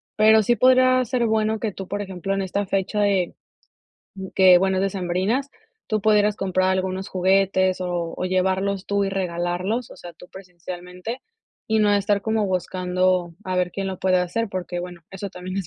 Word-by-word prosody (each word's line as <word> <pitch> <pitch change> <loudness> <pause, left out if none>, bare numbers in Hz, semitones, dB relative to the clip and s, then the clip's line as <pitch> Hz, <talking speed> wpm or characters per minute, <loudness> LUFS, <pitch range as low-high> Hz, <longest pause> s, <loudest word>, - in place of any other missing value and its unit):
pero, 220 +1 +6
sí 240 +4 +2
podría 255 0 +4
ser 245 0 0
bueno 220 0 +1
que 220 -1 -2
tú, 190 -1 -8
por 205 +1 -3
ejemplo, 195 -1 -4
en 195 - -1
esta 195 +2 -2
fecha 195 +2 -1
de, 195 -4 +1 1.0
que 185 -2 +7
bueno 190 0 +1
decembrinas, 195 +7 -1 0.4
tú 215 -2 -1
pudieras 210 0 +3
comprar 185 -1 +1
algunos 190 +1 -2
juguetes, 190 0 +2
o 175 -2 -3
o - - -3
llevarlos 190 +1 0
tú 200 0 0
y - - -1
regalarlos, 185 +4 -2
o - - -12
sea, 175 - -10
tú 180 +2 -16
presencialmente, 180 +4 -8 0.4
y 220 0 +1
no 210 -1 +3
estar 200 0 +1
como 220 -1 0
buscando 185 -1 0
a 185 -1 -2
ver 180 -1 +1
quién 195 -1 -3
lo 190 -1 -4
puede 185 -1 +2
hacer, 205 +6 -1
porque 180 -1 -4
bueno, 175 -1 -8
eso 195 +1 -6
también 185 +1 -7
es 195 -3 -3
190 Hz, 180 wpm, -23 LUFS, 180-205 Hz, 1.0 s, que